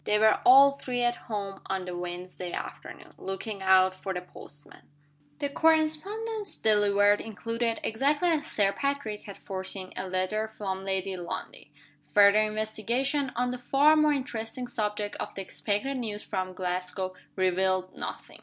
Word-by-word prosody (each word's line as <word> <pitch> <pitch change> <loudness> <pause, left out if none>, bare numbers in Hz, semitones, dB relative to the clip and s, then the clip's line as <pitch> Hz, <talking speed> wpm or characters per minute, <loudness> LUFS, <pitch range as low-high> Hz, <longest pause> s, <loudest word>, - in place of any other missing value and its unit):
They 210 - +2
were 220 0 +4
all 275 +2 +8
three 245 -1 -2
at 240 0 -1
home 200 -2 -4
on 190 -1 -2
the 180 -1 -5
Wednesday 180 0 -6
afternoon, - - -7
looking 195 +2 -5
out 190 0 +5
for 190 0 -5
the 180 - -2
postman. 145 -4 -12 0.6
The 285 - -1
correspondence 325 +9 +1
delivered 205 -1 +4
included 230 +1 -2
(exactly 290 +9 +2
as 310 -2 +1
Sir 200 -2 +2
Patrick 275 -4 -2
had 200 - -9
foreseen) 190 -1 -5
a 190 - -4
letter 185 +4 -1
from 190 -2 -3
Lady 190 0 -1
Lundie. 175 -1 -6 0.5
Further 205 0 +7
investigation, 230 +6 0
on 245 +1 0
the 250 - -5
far 280 +5 +4
more 305 -1 +4
interesting 250 -3 -3
subject 210 -3 -2
of - - -5
the 195 - -4
expected 215 +8 -2
news 215 -4 -4
from 185 -2 -3
Glasgow, 185 +1 -3 0.2
revealed 185 0 +1
nothing. - - -7
210 Hz, 150 wpm, -28 LUFS, 190-250 Hz, 0.6 s, all